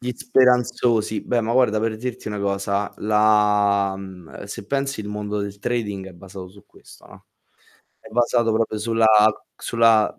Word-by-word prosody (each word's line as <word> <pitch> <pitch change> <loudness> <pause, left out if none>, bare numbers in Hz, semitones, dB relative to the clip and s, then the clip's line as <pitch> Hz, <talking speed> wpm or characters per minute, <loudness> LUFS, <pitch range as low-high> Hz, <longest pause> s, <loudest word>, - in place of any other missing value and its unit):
Gli 125 0 -3
speranzosi. 125 -3 +1
Beh, 120 -1 0
ma 115 +1 -2
guarda, 120 -4 +3
per 110 -1 -2
dirti 120 -1 -6
una 105 - -4
cosa, 100 0 -2
la 105 -2 +2
mhmm, 95 -2 -11
se 100 0 -9
pensi 135 0 -2
il 105 - -7
mondo 105 0 -4
del 100 0 -5
trading 105 -5 -3
è - - -14
basato 95 +1 -11
su 100 +1 -18
questo, - - -18
no, - - -17 0.7
è - - -14
basato 120 0 +1
proprio 110 -1 -1
sulla 115 +1 +1 0.5
sulla 115 -2 +2
105 Hz, 160 wpm, -22 LUFS, 100-115 Hz, 0.7 s, guarda